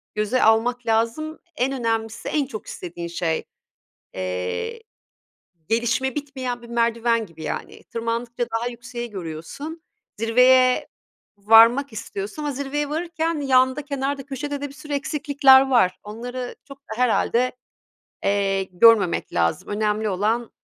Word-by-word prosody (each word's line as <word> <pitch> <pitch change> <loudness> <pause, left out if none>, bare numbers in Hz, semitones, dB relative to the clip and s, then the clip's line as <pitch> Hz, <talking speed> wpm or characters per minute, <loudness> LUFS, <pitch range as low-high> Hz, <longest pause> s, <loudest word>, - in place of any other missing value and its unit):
göze 215 +4 +1
almak 240 +2 +3
lazım, 230 +8 0 0.2
en 265 -1 0
önemlisi 225 -1 -2
en 295 -3 +1
çok 225 -5 -8
istediğin 170 -1 -7
şey. 170 -1 -2 0.7
Eee, 95 - -3 0.9
gelişme 235 +3 +1
bitmeyen 260 -4 -4
bir 235 - -12
merdiven 230 -1 +1
gibi, 160 -3 -13
yani. - - -5
Tırmandıkça 235 +1 -3
daha 240 +1 -2
yükseği 240 0 -7
görüyorsun, 195 - -7 0.4
zirveye 250 +3 +4 0.5
varmak 225 +6 +6
istiyorsun 215 +4 -6
ama 295 - -1
zirveye 280 +2 -2
varırken 325 0 -2
yanda, 260 +1 +3
kenarda, 280 -1 -3
köşede 285 +1 -4
de 285 - -3
bir 275 - -14
sürü 290 +2 -9
eksiklikler 275 -2 +4
var. 210 -8 +3
Onları 245 +4 -6
çok 275 -1 -12
da 225 -5 -9
herhâlde, 250 0 +2 0.7
eee, 195 -1 +1
görmemek 195 0 +4
lazım, 85 -1 0
önemli 210 0 0
olan 215 +5 0
240 Hz, 125 wpm, -23 LUFS, 215-275 Hz, 0.9 s, varmak